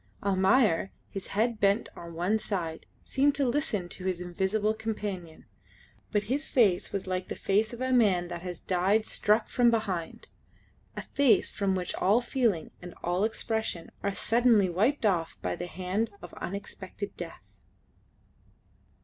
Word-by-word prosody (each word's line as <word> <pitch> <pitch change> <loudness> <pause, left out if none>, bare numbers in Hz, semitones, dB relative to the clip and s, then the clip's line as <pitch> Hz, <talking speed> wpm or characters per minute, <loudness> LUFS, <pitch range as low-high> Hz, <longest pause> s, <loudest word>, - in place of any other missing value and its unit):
Almayer, 195 -1 +3 0.2
his 195 - -5
head 225 +2 0
bent 200 +3 +3
on 170 -1 -9
one 185 +6 +1
side, 170 -7 -4 0.2
seemed 280 +1 +2
to 275 -2 +1
listen 240 -8 0
to 185 - -6
his 185 -2 0
invisible 190 +4 0
companion, 205 -7 -5 0.7
but 210 -1 +1
his 270 +8 -1
face 205 -9 +3
was 195 - -3
like 185 -1 -2
the - - -4
face 210 +2 +1
of 240 +1 -8
a 260 0 0
man 195 -8 +4
that 170 -1 -6
has 180 -1 -5
died 195 +4 +2
struck 215 +1 +2
from 245 -1 +4
behind 195 -8 -2 0.7
a - - -3
face 280 -5 +3
from 195 -2 0
which 180 -1 -2
all 205 +5 +3
feelings 240 - 0
and 175 -1 -9
all 175 +3 +1
expression 220 -5 -2
are 200 -1 -1
suddenly 230 -5 +3
wiped 225 +9 +1
off 170 -5 +1
by 90 -1 -1
the - - -5
hand 185 +5 -2
of 175 - -9
unexpected 200 +1 -6
death. 170 - -8
200 Hz, 155 wpm, -29 LUFS, 180-225 Hz, 0.7 s, man